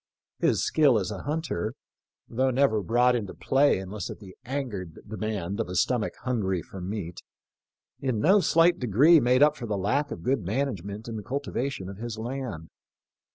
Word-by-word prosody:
His - - +2
skill 145 -7 +4
as 100 0 -2
a 100 - -5
hunter 150 - -3 0.3
— - - -63
though 130 +3 +1
never 125 -4 +2
brought 120 +6 +3
into 105 -5 -4
play 140 +2 +3
unless 95 +2 -5
at - - -7
the 95 -3 -13
angered 115 - -4
de 110 - -6
mand 105 -2 -3
of 115 - -2
a 90 - -5
stomach 115 +3 +1
hungry 100 -8 -1
for 95 - -10
meat 90 -2 -5 0.4
— - - -59
in 130 -5 0
no 190 - +5
slight 170 -1 +4
degree 130 - +5
made 125 +1 +4
up 150 0 +4
for 120 -5 -6
the 105 -2 -1
lack 135 +10 0
of 85 - -7
good 130 +1 +1
management 105 -1 -3
in 115 -1 -5
the - - -5
cultivation 135 -4 -3
of 95 0 -8
his 115 0 -5
land. 120 -9 -5
115 Hz, 190 wpm, -27 LUFS, 100-135 Hz, 0.4 s, no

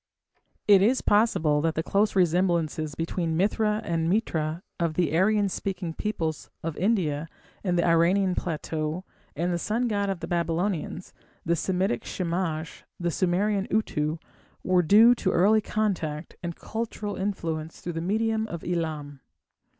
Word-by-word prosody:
It 200 -2 +7
is 240 +6 +3
possible 165 -9 +3
that 160 0 0
the 160 - -1
close 205 +4 +1
resemblances 170 -4 +1
between 165 0 -2
Mithra 210 +3 +1
and 165 -1 0
Mitra 165 -4 -1 0.2
of 165 -2 0
the 170 -2 +1
Aryan 205 +3 +3
speaking 185 -3 -3
peoples 165 -6 -3
of 165 -1 -3
India 165 -7 0 0.4
and 180 -3 +1
the 170 - +2
Iranian 180 +3 +3
plateau, 160 0 -3 0.3
and 175 +4 0
the 170 - -1
sun 230 +7 0
god 200 -3 0
of 190 -3 -2
the - - -5
Babylonians 170 +1 -2 0.3
the 170 - +2
Semitic 190 +5 0
Shamash, 170 -2 -3 0.2
the 175 -1 0
Sumerian 195 +4 +1
Utu 155 -7 0 0.5
were 185 -1 +3
due 215 +8 +7
to 200 -6 -1
early 210 +5 +4
contact 180 -8 -2
and 170 -2 -4
cultural 220 -2 -4
influence 165 -5 -3
through 175 - -5
the 165 - -3
medium 220 +4 0
of 170 -6 -6
Elam. 155 -5 -3
175 Hz, 145 wpm, -26 LUFS, 165-205 Hz, 0.5 s, It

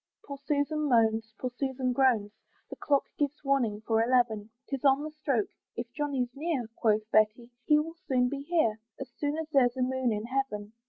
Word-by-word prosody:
Poor 280 -1 -7
Susan 285 +2 0
moans, 225 -2 +2
poor 255 - -3
Susan 260 0 -2
groans, 240 -6 +2 0.4
The - - -5
clock 280 -2 +1 0.2
gives 290 0 -1
warning 245 -7 +1
for 225 -1 +2
eleven; 230 -4 +1 0.2
'Tis 275 -2 -4
on 275 +1 +4
the 310 - -5
stroke 275 -8 -1 0.3
"If 235 0 -5
Johnny's 275 -5 -1
near," 290 -3 -2
Quoth 215 -2 +1
Betty 215 +3 +2 0.2
"he 300 - +6
will 315 +2 -1
soon 250 -2 +3
be 275 +2 -4
here, 280 -9 +1 0.2
"As 270 -2 -7
sure 295 +1 -1
as 320 -1 -5
there's 255 -3 +3
a 255 - +1
moon 260 -1 0
in 210 0 -2
heaven." 230 -5 -3
255 Hz, 190 wpm, -29 LUFS, 230-285 Hz, 0.4 s, he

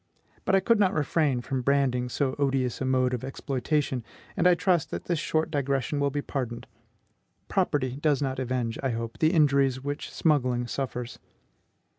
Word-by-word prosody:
But 190 - +3
I 195 - +4
could 230 +3 +3
not 195 -1 +3
refrain 145 -3 +1
from 130 +1 -2
branding 130 -2 +1
so 135 +1 -1
odious 135 -3 0
a - - 0
mode 130 -1 +2
of 125 - -3
exploitation, 135 0 -1 0.3
and 180 -2 +3
I 180 - +6
trust 175 -3 +1
that - - -5
this 170 -3 -1
short 160 0 0
digression 140 0 0
will 140 0 +2
be 145 +1 -3
pardoned. 120 -4 -4 0.8
Property 130 -3 0
does 150 -1 +2
not 135 -2 -2
avenge, 125 -3 -2
I 135 - 0
hope, 115 -1 -4
the 155 0 +4
injuries 140 -5 +3
which 145 +1 -4
smuggling 125 -6 +1
suffers. 125 -1 -4
135 Hz, 170 wpm, -27 LUFS, 125-150 Hz, 0.8 s, I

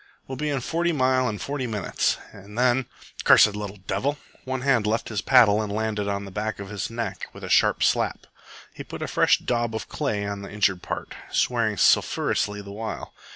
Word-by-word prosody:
"We'll 130 - -5
be 150 +3 -2
in 140 -3 -1
Forty 170 +6 0
Mile 130 -4 +2
in 105 - -4
forty 140 +2 -3
minutes, 105 -4 0
and 100 +2 -12
then 125 0 +2 0.4
cursed 105 -1 +6
little 105 -1 -5
devil!" 145 +2 -1 0.3
One 130 0 -3
hand 125 -6 +2
left 110 +2 -1
his 105 -3 -2
paddle 110 -5 +5
and 105 -2 -4
landed 105 -1 -1
on 100 0 -2
the 100 - -9
back 105 +2 -3
of 100 -1 -8
his 105 -2 -3
neck 115 0 -4
with - - -12
a - - -5
sharp - - +4
slap. - - +1 0.5
He - - -8
put - - -7
a - - -3
fresh - - +4
daub 120 -2 -1
of 110 - -5
clay 110 -9 -2
on 100 0 -4
the 100 - -8
injured 100 -3 +1
part, - - -5 0.2
swearing 115 -4 +1
sulphurously 105 +2 +2
the 100 - -9
while. 110 +1 -6
110 Hz, 200 wpm, -25 LUFS, 105-130 Hz, 0.5 s, cursed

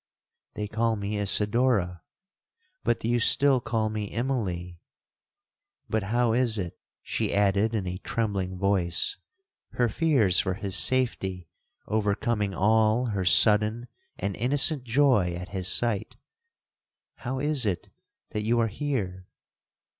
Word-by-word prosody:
'—'They 105 - -3
call 115 +1 0
me 105 0 -3
Isidora, 105 -2 +1 0.8
but 120 - +1
do - - -4
you 120 +1 +2
still 135 +2 +4
call 115 -2 -1
me 105 -2 -4
Immalee. 95 -9 -3 1.1
But 110 - -1
how 115 +3 +1
is 120 -2 +2
it,' 90 -4 -5 0.2
she - - -2
added 100 +2 +1
in 100 -4 -2
a 90 0 -4
trembling 100 -6 -2
voice,—her 100 - -2
fears 115 - +2
for 95 -1 -1
his 100 -2 -3
safety 95 -10 0 0.4
overcoming 105 -1 -1
all 110 +5 +2
her 95 -2 -1
sudden 105 +5 +4 0.3
and 100 0 -3
innocent 135 +3 +3
joy 120 -8 +3
at 90 +2 -7
his 95 -2 -4
sight—'how 125 - -5
is 145 -3 +1
it 90 -5 -3 0.4
that 105 - -3
you 115 +3 +1
are 115 -1 +1
here? 100 -8 -4
110 Hz, 125 wpm, -26 LUFS, 95-120 Hz, 1.1 s, still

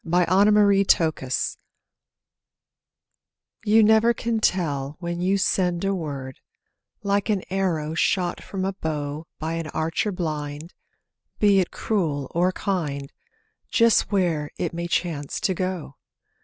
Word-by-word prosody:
YOU - - -10
NEVER 200 +3 +5
CAN 165 -4 +3
TELL 130 -4 -3 2.1
You 220 +1 +5
never 220 +2 +5
can 230 -1 -1
tell 150 -8 0
when 175 0 -4
you 190 +2 +2
send 180 -2 +1
a 195 - +1
word, 140 -7 -5 0.6
Like 200 +1 0
an 205 -3 +1
arrow 170 -5 -1
shot 175 +2 0
from 190 -1 -4
a 195 - -1
bow 155 -3 -4
By 160 +1 -3
an 165 -1 -3
archer 160 +7 -1
blind, 155 -2 -4 0.6
be 200 -2 +4
it 180 - +1
cruel 155 -10 -2
or 180 +2 +2
kind, 150 -9 -3 0.6
Just 230 -2 +3
where 170 -7 +1
it - - -2
may 170 +1 -3
chance 170 -4 -2
to 190 - +1
go! 180 -6 -4
175 Hz, 130 wpm, -24 LUFS, 155-195 Hz, 2.1 s, NEVER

